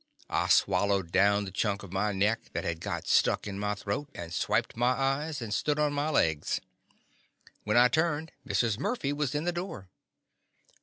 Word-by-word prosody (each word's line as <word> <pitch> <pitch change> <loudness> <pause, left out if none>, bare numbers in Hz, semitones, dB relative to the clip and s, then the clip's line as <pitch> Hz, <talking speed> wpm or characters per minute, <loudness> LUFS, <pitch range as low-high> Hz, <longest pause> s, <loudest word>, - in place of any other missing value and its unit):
I - - +1
swallowed 95 -2 +2
down 100 +2 +3
the 95 - -7
chunk 100 +1 -1
of 95 -2 -10
my 105 +2 +1
neck 105 +3 0
that - - -2
had 80 -1 -2
got - - -4
stuck - - +3
in 100 -1 -5
my 105 0 -1
throat, 105 +8 -4
and 85 -1 -7
swiped - - 0
my 120 +2 +2
eyes, 135 +1 -1
and 105 -2 -4
stood 150 +5 0
on 150 -1 +1
my 145 +2 0
legs. 80 - +1 1.1
When 105 +2 +2
I 125 +1 +8
turned, 160 +3 0
Mrs. 105 +2 0
Murphy 145 - -1
was 145 -1 -2
in 150 - 0
the 175 - 0
door. 175 - -6
110 Hz, 185 wpm, -29 LUFS, 100-145 Hz, 1.1 s, I